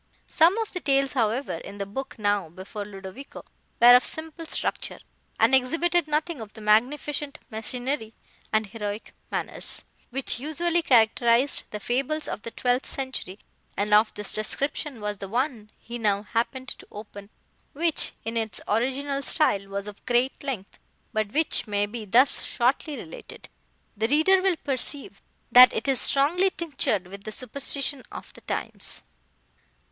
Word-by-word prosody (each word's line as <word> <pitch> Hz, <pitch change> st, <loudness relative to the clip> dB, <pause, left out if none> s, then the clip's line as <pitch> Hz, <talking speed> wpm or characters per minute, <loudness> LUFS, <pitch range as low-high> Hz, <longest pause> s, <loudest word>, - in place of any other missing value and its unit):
Some 345 Hz, +6 st, +4 dB
of 450 Hz, -2 st, -3 dB
the 360 Hz, -, -3 dB
tales, 275 Hz, -3 st, +1 dB
however, 230 Hz, -6 st, 0 dB
in 200 Hz, +4 st, -10 dB
the 200 Hz, -, -3 dB
book 265 Hz, +7 st, -6 dB
now 205 Hz, -5 st, 0 dB
before 190 Hz, +5 st, -7 dB
Ludovico, 195 Hz, +6 st, -10 dB, 0.3 s
were 240 Hz, +1 st, +9 dB
of 250 Hz, -, +5 dB
simple 320 Hz, +1 st, -6 dB
structure, -, -, -2 dB, 0.4 s
and 225 Hz, +4 st, +4 dB
exhibited 330 Hz, +6 st, +2 dB
nothing 305 Hz, -1 st, -1 dB
of 215 Hz, -1 st, -9 dB
the -, -, -11 dB
magnificent 280 Hz, +7 st, +1 dB
machinery 225 Hz, +1 st, -3 dB, 0.4 s
and 215 Hz, 0 st, +2 dB
heroic 210 Hz, 0 st, -6 dB, 0.2 s
manners, -, -, -4 dB, 0.3 s
which 260 Hz, -2 st, 0 dB
usually 335 Hz, +5 st, 0 dB
characterised 235 Hz, 0 st, +4 dB
the 210 Hz, -, -6 dB
fables 270 Hz, +8 st, -1 dB
of -, -, -4 dB
the 230 Hz, -, -6 dB
twelfth 250 Hz, +2 st, 0 dB
century, 260 Hz, -8 st, -4 dB, 0.4 s
and 210 Hz, +1 st, 0 dB
of 215 Hz, +1 st, +5 dB
this 210 Hz, -1 st, -3 dB
description 275 Hz, +3 st, -2 dB
was 210 Hz, 0 st, -3 dB
the 195 Hz, -, -6 dB
one 240 Hz, -2 st, -2 dB
he 240 Hz, +1 st, -8 dB
now 205 Hz, -2 st, +1 dB
happened 245 Hz, +4 st, -2 dB
to -, -, -8 dB
open, 205 Hz, -1 st, -10 dB, 0.4 s
which, 325 Hz, +2 st, +1 dB
in 225 Hz, +1 st, -2 dB
its 220 Hz, -1 st, -2 dB
original 270 Hz, +5 st, 0 dB
style, 200 Hz, -10 st, +3 dB
was 200 Hz, 0 st, -4 dB
of 210 Hz, -1 st, -10 dB
great 245 Hz, +3 st, +1 dB
length, 245 Hz, -9 st, -5 dB, 0.3 s
but 215 Hz, -1 st, -1 dB
which 305 Hz, -3 st, +1 dB
may 205 Hz, -1 st, +1 dB
be 215 Hz, +1 st, -7 dB
thus 245 Hz, +7 st, +5 dB
shortly 265 Hz, +4 st, 0 dB
related. -, -, -10 dB, 0.5 s
The 220 Hz, +1 st, 0 dB
reader 315 Hz, +8 st, +4 dB
will 380 Hz, -2 st, +2 dB
perceive 280 Hz, +4 st, -5 dB, 0.3 s
that 250 Hz, 0 st, +10 dB
it 225 Hz, -, -3 dB
is 270 Hz, -2 st, +3 dB
strongly 335 Hz, +8 st, +4 dB
tinctured 275 Hz, -, 0 dB
with 200 Hz, +2 st, -11 dB
the 215 Hz, -, -6 dB
superstition 275 Hz, +3 st, 0 dB
of -, -, -9 dB
the -, -, -15 dB
times. -, -, -4 dB
245 Hz, 155 wpm, -26 LUFS, 210-285 Hz, 0.5 s, that